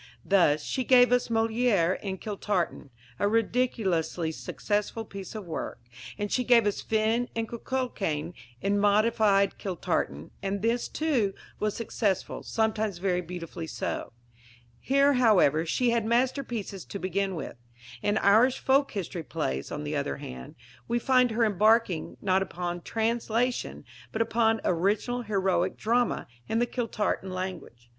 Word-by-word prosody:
Thus, 155 -6 +3
she 260 - -2
gave 245 0 +6
us 250 0 +3
Molière 225 -5 +2
in 190 -2 -4
Kiltartan 200 -7 -2 0.3
a - - +2
ridiculously 205 -7 0
successful 210 +6 -2
piece 195 0 -8
of 215 -3 -6
work 165 - -5 0.4
and 205 0 -3
she 250 - +1
gave 240 -2 +5
us 205 - 0
Finn 225 +2 +1
and 225 0 -1
Cuchullain 210 - -3 0.3
in 200 +1 +2
modified 205 -1 +3
Kiltartan, 125 - -2
and 200 +1 -2
this, 235 +1 +1
too, 255 -11 0 0.2
was 210 -1 -1
successful, 205 -4 -1
sometimes 220 -3 -1
very 180 -1 0
beautifully 170 -1 -7
so. - - -4 0.7
Here, 275 - +3
however, 185 - +4
she 245 +8 +2
had 235 -1 +1
masterpieces 235 -4 -1
to - - -6
begin 190 +1 -1
with. 160 - -6 0.4
In 205 +1 +1
Irish 225 +6 +4
Folk 275 +1 +2
History 185 -4 -4
Plays, 65 - -3
on 150 - -4
the 150 +1 -3
other 140 - -2
hand, 65 -1 -9 0.3
we 235 - +1
find 255 0 +3
her 230 +1 +2
embarking, 215 -3 +2
not 190 -1 +3
upon 175 -2 -4
translation, 230 +3 -1 0.3
but 225 - +1
upon 225 -1 +1
original 205 +8 +1
heroic 190 -4 0
drama, 240 +2 +1 0.2
in 225 - 0
the 240 - +3
Kiltartan 230 -5 -2
language. 185 -10 -6
210 Hz, 140 wpm, -28 LUFS, 185-235 Hz, 0.7 s, gave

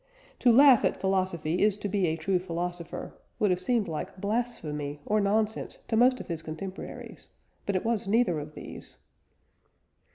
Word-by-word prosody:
"To 245 - +5
laugh 265 0 +7
at - - +1
philosophy 185 -3 0
is 205 -1 +3
to 205 - -3
be 195 -2 +1
a 160 - 0
true 185 +2 +1
philosopher" 175 -1 -5 0.2
would 205 -3 +2
have 180 - +1
seemed 225 +2 +1
like 160 +3 -5
blasphemy 165 -10 -2
or 215 0 +2
nonsense 215 +2 0
to 225 - +1
most 255 +3 +5
of - - -7
his 165 -2 -4
contemporaries, 185 +5 -8 0.4
but 200 - 0
it 185 - -1
was 230 -2 0
neither 205 -6 +2
of 150 +1 -8
these. - - -9
195 Hz, 165 wpm, -28 LUFS, 170-220 Hz, 0.4 s, laugh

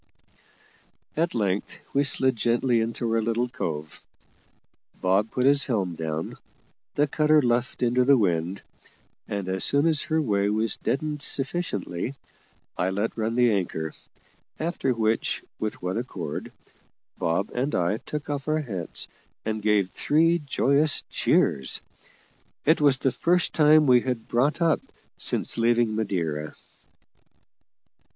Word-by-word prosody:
At 165 -1 0
length 100 -3 -1 0.2
we 140 - +3
slid 130 -2 +1
gently 120 +1 +2
into 115 +1 -3
our 115 - +2
little 115 +2 0
cove. 80 - -5 1.0
Bob 95 +4 +2
put 125 +2 -1
his 140 0 +5
helm 100 -9 0
down; 80 0 -4 0.6
the 145 - +3
cutter 150 +1 +3
luffed 120 -1 0
into 125 +1 +3
the 140 +1 +5
wind, 90 -3 0 0.6
and, 100 -2 -4
as 95 0 0
soon 140 +2 +4
as 160 -3 +3
her 160 0 0
way 100 -8 +1
was 110 +1 +1
deadened 150 +1 -2
sufficiently, 135 - -1 0.6
I 90 - 0
let 100 +4 -2
run 115 0 -1
the 120 -1 +4
anchor; 85 -6 -2 0.7
after 160 -4 -1
which, 110 -2 0 0.2
with 110 -3 -4
one 90 +5 -1
accord, 90 - -5 0.7
Bob 85 +5 0
and 130 +4 -1
I 90 +4 +1
took 150 +5 -6
off 145 -1 -4
our 155 0 +1
hats 95 - -4 0.4
and 110 0 -2
gave 105 -3 +2
three 165 +3 +2
joyous 145 +1 +2
cheers. 65 -1 +1 0.9
It 160 +1 +4
was 140 -3 +5
the 135 -1 +1
first 175 +8 +2
time 155 0 +5
we 125 -3 +5
had 125 -3 -3
brought 140 +7 +1
up 165 -2 +3 0.4
since - - 0
leaving 115 -1 +2
Madeira. 85 -8 -2
120 Hz, 135 wpm, -25 LUFS, 100-140 Hz, 1.0 s, his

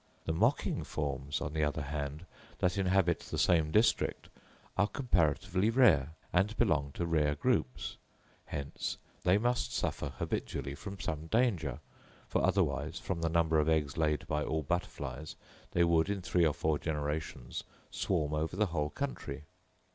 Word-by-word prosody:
The 80 - 0
mocking 115 - +1
forms, 70 -2 -3
on 75 - -3
the 80 -1 +1
other 75 0 0
hand, 75 +2 -4 0.3
that 90 0 +1
inhabit 95 -3 +2
the - - -6
same 80 -4 +4
district, 110 +8 +2 0.5
are 100 +2 +3
comparatively 95 - +1
rare, 95 - +5 0.2
and 100 +5 +2
belong 75 -11 +2
to 85 - -2
rare 75 -3 +2
groups; 70 -1 0 0.5
hence, 70 -1 -4 0.3
they 90 +2 +5
must 120 +2 0
suffer 75 - -1
habitually 70 0 -3
from 100 +6 -7
some 80 -4 -3
danger, 85 - +1 0.5
for - - 0
otherwise, 80 +4 +1
from 85 -1 -3
the 80 - +1
number 80 -1 +3
of 75 +1 +2
eggs 75 -4 +1
laid 75 -3 +1
by 75 0 0
all 80 0 -1
butterflies, 80 -1 -3 0.3
they 85 - +3
would 85 +1 +3
in 100 -2 -2
three 85 -2 +3
or 75 - +1
four 80 -2 +1
generations 75 -5 -3 0.3
swarm 75 -1 0
over 80 +3 -1
the 105 +2 +3
whole 75 -2 0
country. 75 - -4
80 Hz, 155 wpm, -32 LUFS, 75-95 Hz, 0.5 s, rare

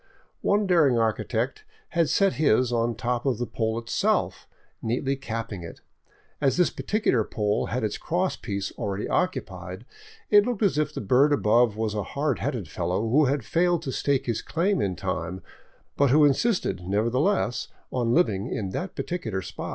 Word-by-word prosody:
One 205 +1 +2
daring 160 -9 +4
architect 115 - -1 0.3
had 170 -3 +1
set 195 -1 +3
his 125 -3 +2
on 115 0 +1
the - - -15
top 120 0 -1
of 130 -5 0
the 120 - -2
pole 110 -1 -2
itself, 115 0 0 0.3
neatly 130 +4 -1
capping 115 -6 -5
it. 85 -1 -10 0.6
As 140 +1 +2
this 180 -2 +3
particular 205 - +1
pole 105 -1 -1
had 125 -1 -2
its 105 - -2
cross 180 +3 -1
piece 100 -3 -4
already 100 -2 -2
occupied, 185 +1 -2 0.5
it 205 -1 +7
looked 235 -2 -2
as 185 -7 +2
if 150 -1 0
the - - -5
bird 130 +8 +4
above 110 -2 +3
was 110 -1 -1
a 105 - -1 0.2
hard 145 -2 0
headed 105 -9 -3
fellow 90 +7 -2
who 145 +6 +4
had 135 -3 0
failed 175 +2 +1
to 135 - -3
stake 140 0 0
his 115 -3 -1
claim 185 +4 0
in 95 -2 -1
time, 90 0 -4 0.5
but 140 -1 +4
who 150 +3 +6
insisted, 180 - +1
nevertheless, 120 - +1 0.2
on 120 -2 0
living 105 - +2
in 95 -4 -3
that 180 - -4
particular 110 - -3
spot. - - -6
125 Hz, 175 wpm, -26 LUFS, 110-160 Hz, 0.6 s, it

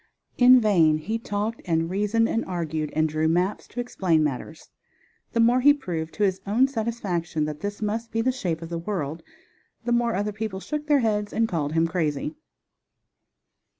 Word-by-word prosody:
In 250 +1 +8
vain 170 -9 +4
he 215 +9 -3
talked 215 +1 -3
and 165 -2 +1
reasoned 210 +5 +1
and 230 - 0
argued, 160 -4 -3
and 155 0 +3
drew 155 +1 0
maps 180 +5 0
to 245 - -8
explain 185 -9 +1
matters. 150 +2 -5 0.6
The 230 - 0
more 240 +2 +4
he 290 +2 +6
proved 165 - -5
to 210 - 0
his 190 -1 +1
own 235 +6 +4
satisfaction 205 - -2
that 150 -1 -5
this 205 +4 -4
must 225 +2 -2
be 225 - 0
the 255 +3 +2
shape 175 -10 -3
of 165 - -7
the 170 -1 -3
world, 165 -4 -3 0.6
the 240 - -1
more 235 -1 +2
other 205 +2 -1
people 205 -2 -4
shook 300 +7 -5
their 290 -2 +4
heads 210 -2 0
and 225 0 +1
called 155 -6 -2
him 165 0 +3
crazy. 165 - -1
200 Hz, 185 wpm, -25 LUFS, 165-230 Hz, 0.6 s, In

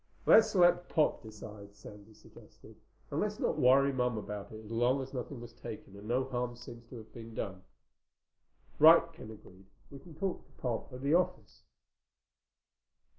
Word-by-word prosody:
"Let's 220 -1 +6
let 175 -1 +4
Pop 155 -3 +1
decide," 105 -2 -11
Sandy 105 +2 -13
suggested. - - -17 0.4
"And - - -1
let's - - -1
not - - 0
worry 135 +2 +5
Mom 125 -3 0
about 105 -1 -6
it 110 0 -10
as 105 - -11
long 120 +4 +2
as 135 0 -7
nothing 125 0 -5
was 120 - -10
taken 110 -4 -9
and 100 +1 -11
no 125 +3 +1
harm 125 -2 -3
seems 120 -1 -11
to 125 - -9
have 110 -1 -13
been 115 -1 -10
done." 95 -3 -5 1.2
"Right," 165 +2 +7
Ken 160 -9 -11
agreed. 95 -3 -14 0.2
"We 140 - -10
can 160 +3 -14
talk 190 +3 -3
to - - -27
Pop 125 +1 -4
at 125 0 -9
the 140 +2 +2
office." 180 +2 0
120 Hz, 175 wpm, -32 LUFS, 110-140 Hz, 1.2 s, Right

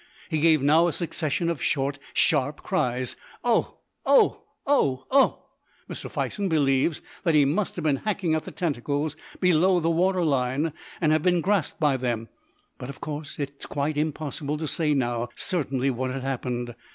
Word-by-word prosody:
He 160 - 0
gave 160 -3 +4
now 160 +4 +5
a 170 - -1
succession 165 -1 -1
of 170 -4 -2
short, 140 0 0 0.2
sharp 145 +3 +2
cries, 125 +1 -1 0.3
"Oh! 240 -2 +1 0.2
oh! 470 -4 +4 0.2
oh! 135 - +2
oh!" 275 +1 +4 0.4
Mr. - - -7
Fison 200 -2 -2
believes 145 0 +2 0.2
that 165 -3 +2
he 145 -2 +6
must 185 +9 0
have 175 - -4
been 145 -3 +2
hacking 195 -4 -1
at 155 - -1
the - - -6
tentacles 145 -1 -2 0.2
below 180 +1 +4
the 165 0 +1
water 180 +2 +2
line, 140 +1 0 0.3
and 155 -3 +2
have 155 0 +3
been 180 +1 +3
grasped 190 -1 0
by 145 -4 +3
them, 120 -3 -2 0.5
but, 125 - -7
of 140 - -8
course, 150 -2 -6
it 140 -1 -3
is - - -7
quite 145 +2 -1
impossible 150 -1 -2
to 155 0 -3
say 150 -1 +1
now 120 -2 -1
certainly 135 -7 0
what 130 +1 -2
had 130 0 -4
happened. 125 -2 -3
150 Hz, 175 wpm, -26 LUFS, 135-170 Hz, 0.5 s, he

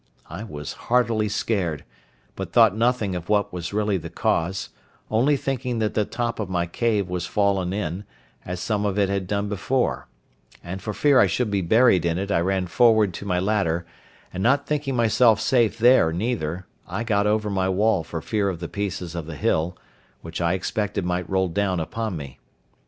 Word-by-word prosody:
I 90 +6 -6
was 75 -9 -7 0.2
heartily 115 -3 +2
scared; 90 -8 -1 0.5
but - - -5
thought 115 -4 +5
nothing 115 -3 +1
of 90 0 -5
what 105 -2 +1
was 90 -1 -4
really 105 -1 0
the 85 - -7
cause, 95 +4 -1 0.4
only 130 +7 +3
thinking 125 -2 -2
that 110 -1 0
the 105 - +1
top 120 +1 -3
of 105 -4 -3
my 90 -2 0
cave 105 +2 0
was 90 -1 -3
fallen 100 -2 +1
in, 95 -1 -3 0.4
as 90 0 -5
some 105 +2 -1
of 100 -1 -1
it 100 -2 +2
had 100 -2 -2
done 100 +1 -1
before: 105 +6 -1 0.6
and 90 +2 -6
for 105 - -4
fear 145 -3 +4
I - - +6
should 125 -4 -1
be 100 -1 +1
buried 110 0 +4
in 85 0 0
it 100 +2 -3
I 85 - +3
ran 95 +1 0
forward 110 0 +4
to 100 - -7
my 90 -2 +1
ladder, 90 -4 0 0.5
and 90 - -4
not 140 +6 +3
thinking 145 -3 -1
myself 115 -1 +4
safe 120 -5 +2
there 115 -8 +5
neither, 90 -3 -2 0.2
I 100 +6 -3
got 105 -3 +1
over 105 0 +1
my 95 -1 0
wall 100 -1 +2
for 80 0 -6
fear 105 -3 0
of 90 -3 -4
the 85 - -5
pieces 95 -4 -4
of 85 -3 -5
the 80 - -6
hill, 80 +5 0 0.4
which 80 +1 -6
I 85 +1 +2
expected 105 0 -2
might 90 0 -2
roll 95 -1 +1
down 95 0 0
upon 110 +3 -3
me. 70 -4 -9
100 Hz, 195 wpm, -24 LUFS, 90-110 Hz, 0.6 s, I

